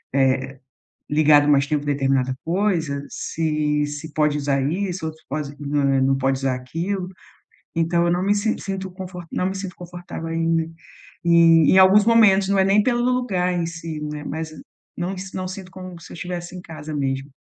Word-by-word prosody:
eh, 135 0 +1 0.5
ligado 150 -1 +5
mais 140 -1 +4
tempo 150 0 -1
determinada 135 -2 +1
coisa, 165 -6 0
se 150 -2 -1
se 145 +1 -7
pode 150 -1 +2
usar 140 -1 0
isso, 180 +4 -2
ou 160 - -5
se 160 - -22
pode 145 0 -4
não 145 0 -1 0.2
não 135 0 +2
pode 135 0 0
usar 135 -1 0
aquilo. 175 +9 -3 0.7
Então 170 +1 +2
eu - - +2
não 180 - 0
me 205 +1 +3
sin 220 +2 0
sinto 190 -1 -5
conf 185 0 -8 0.2
não 180 - -1
me - - -5
sinto 190 -2 -6
confortável 175 -2 -7
em 165 0 0 0.5
em 165 -2 +6
em 190 - +6
alguns 190 +2 +7
momentos. 205 -4 +5
Não 200 0 +2
é 190 - +5
nem 200 +2 +4
pelo 240 +1 +1
lugar 240 -8 +1
em 175 -1 0
si, 165 -2 -6
né, 150 0 -5
mas 160 +2 -4 0.5
não 180 +2 -2 0.2
não 185 -1 -3
sinto 185 0 -8
como 185 -2 -9
se - - -13
eu - - -8
estivesse 175 +1 -6
em - - -7
casa 155 -2 -8
mesmo. 135 -1 -2
165 Hz, 185 wpm, -22 LUFS, 145-185 Hz, 0.7 s, alguns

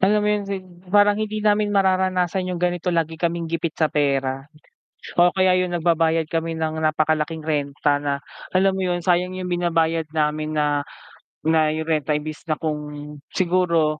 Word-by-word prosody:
Alam 210 +3 +4
mo - - +2
yung 205 -1 -2
sib 195 -1 -4 0.2
parang 205 +2 +5
hindi 215 0 -3
namin 210 0 +3
mararanasan 185 -1 +1
yung 180 - -2
ganito 175 0 0
lagi 165 -2 -1
kaming 170 -1 0
gipit 165 -1 -2
sa 160 - +2
pera, 135 -1 0 0.7
o 175 0 +5
kaya 185 0 +3
yun 180 - -1
nagbabayad 165 -1 +2
kami 165 +1 -2
ng 160 0 -2
napakalaking 155 0 0
renta, 145 -1 0
na 140 -1 -1 0.3
alam 190 +1 +3
mo 190 - -3
yun 180 -1 0
sayang 180 +1 +1
yung 185 - -4
binabayad 165 -2 +1
namin 155 0 -1
na 145 -1 +1 0.6
na 160 -1 +3
yung 160 0 -4
renta 150 -1 +1
imbes 150 0 -4
na 155 - +1
kung 155 -1 -2 0.6
siguro 170 -4 +2
165 Hz, 165 wpm, -22 LUFS, 155-185 Hz, 0.7 s, parang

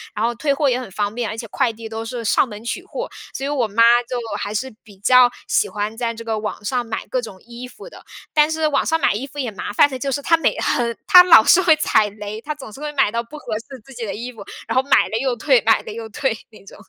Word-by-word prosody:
然 215 - 0
后 240 - 0
退 280 +5 -1
货 280 +1 +1
也 250 -1 +1
很 255 - -8
方 205 +2 -2
便， 235 -2 -3
而 220 - -6
且 230 - -6
快 235 - 0
递 225 0 -9
都 225 0 -5
是 230 0 -6
上 220 - +3
门 210 0 -9
取 300 +10 -4
货， - - -6 0.3
所 270 - -4
以 - - -2
我 265 -6 0
妈 220 +3 +3 0.3
就 250 - -2 0.2
还 205 - -4
是 260 +3 -3
比 205 -3 -18
较 250 +5 +5 0.2
喜 - - +1
欢 210 +1 -4
在 235 0 -2
这 230 - -9
个 225 -1 -2
网 210 0 -5
上 250 +2 -1
买 225 -1 -5
各 255 - -2
种 210 -5 -10
衣 240 +1 -9
服 415 - -13
的。 - - -14 0.3
但 300 0 +4
是 315 0 0
网 300 - +1
上 325 0 0
买 - - +2
衣 240 +7 -4
服 280 - -16
也 255 -5 -2
麻 205 - -6
烦 285 - +5
的 265 -3 -7
就 275 +1 -2
是， 270 - -1
她 330 - +4
每 325 - 0
很 235 -1 -1
她 360 - +9
老 355 -11 +7
是 360 - +5
会 335 -4 +5
踩 220 -8 +2
雷， 210 +1 -8
她 300 +4 -5
总 270 -7 -11
是 - - -11
会 300 0 -4
买 270 -7 +2
到 230 +1 -1
不 235 +6 -12
合 245 -6 -6
适 260 +3 -12
自 270 - -14
己 240 -2 -5
的 - - -4
衣 240 +3 -6
服， 225 - -10 0.2
然 - - -3
后 260 - +5
买 - - +6
了 220 - -2
又 260 -2 0
退， 255 0 +3
买 225 0 +3
了 - - -8
又 225 +1 -7
退， 255 +2 -1
那 215 - -17
种。 - - -13
240 Hz, 315 characters per minute, -20 LUFS, 220-275 Hz, 0.3 s, 她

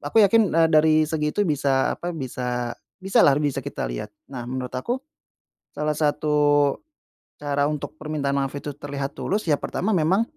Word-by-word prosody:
Aku - - -6
yakin, 215 +1 +4
eee, 165 0 +5
dari 155 0 +5
segitu 155 +5 0
bisa 140 -5 +1
apa, 175 - -5
bisa 125 -4 -3 0.2
bisa 195 0 +2
lah 140 - +6
bisa 145 -3 0
kita - - -4
lihat. - - -5 0.2
Nah 125 -3 -5
menurut 125 -1 -4
aku, 235 - -2 0.7
salah 150 0 -1
satu 145 -1 +2 0.6
cara 145 -1 0
untuk 150 0 -5
permintaan 150 -2 -2
maaf 135 -1 0
itu 145 +1 -5
terlihat 140 -1 -4
tulus, 210 +3 -1
ya 150 - +4
pertama 205 +5 -2
memang, 180 +6 +3
150 Hz, 160 wpm, -24 LUFS, 140-160 Hz, 0.7 s, lah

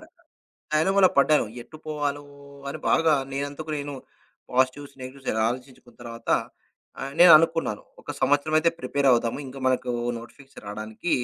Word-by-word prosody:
డ - - -19 0.7
డైలమాలో 190 +5 +4
పడ్డాను. 145 -3 +4 0.2
ఎట్టు 125 +6 -14
పోవాలో 145 -1 -2 0.5
అని 155 - -5
బాగా 165 -1 +4 0.2
నేనందుకు 145 +3 -4
నేను 145 0 -5 0.6
పాజిటివ్స్ 130 +2 0
నెగెటివ్స్ 130 +1 -10 0.2
ఆలోచించుకున్న 125 0 -8
తర్వాత 115 -1 -10 0.7
ఆహ్, 135 0 -5
నేననుకున్నాను 165 -8 +6
ఇంకొక - - -9
సంవత్సరం 145 +2 +2
అయితే 165 +1 +3
ప్రిపేరవుదాము. 125 -4 +1
ఇంక 130 +1 -10
మనకు 125 -1 +1 0.3
నోటిఫికేషన్స్ 135 +4 -14
రాడానికి 110 +10 -5
140 Hz, 125 wpm, -25 LUFS, 125-155 Hz, 0.7 s, నేననుకున్నాను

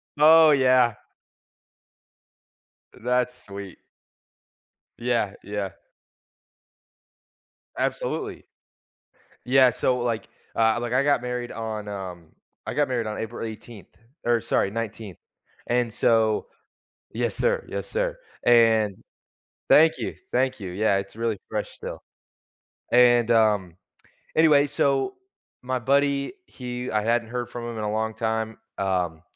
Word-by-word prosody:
Oh, 155 +1 +7
yeah. 130 -4 +4 2.0
That's 125 +1 -1
sweet. 100 -2 -9 1.2
Yeah, 115 -4 0
yeah. 100 -1 -4 2.1
Absolutely. - - -3 1.0
Yeah, 130 0 +5
so, 125 +2 0
like, 120 -2 -2 0.3
uh, 110 0 +3
like, 120 0 -3
I 130 +2 +3
got 145 -2 +2
married 125 0 -4
on, 110 -2 -5
um, 95 -4 -7 0.4
I - - -4
got 145 0 +2
married 120 -3 -1
on 105 - -4
April 115 +1 -5
18th, 110 -1 -10 0.4
or 120 -1 +3
sorry, 100 - 0
19th, 110 -3 -5 0.5
and 120 -1 +1
so 110 -1 +2 0.7
yes, - - -1
sir, 485 -1 0
yes, - - -5
sir. - - -2 0.3
And 110 -4 +4 0.7
thank 160 +1 +6
you, - - -4 0.2
thank 130 -1 +1
you. 95 -3 -5
Yeah, 100 +1 +1
it's 100 +2 -7
really 115 -2 -1
fresh - - -3
still. - - -8 0.9
And, 120 -1 +5
um, 105 -6 +2 0.6
anyway, 150 -3 +5
so, 140 - 0 0.5
my 130 0 -2
buddy, 140 - +1
he 125 - -6
I 105 -1 +1
hadn't 115 0 +1
heard 120 0 -4
from 120 -1 -6
him 115 - -6
in 110 - -3
a 105 - -1
long 110 +1 -1
time, 110 0 -2 0.2
um, 90 -4 -1
115 Hz, 120 wpm, -25 LUFS, 110-125 Hz, 2.1 s, Oh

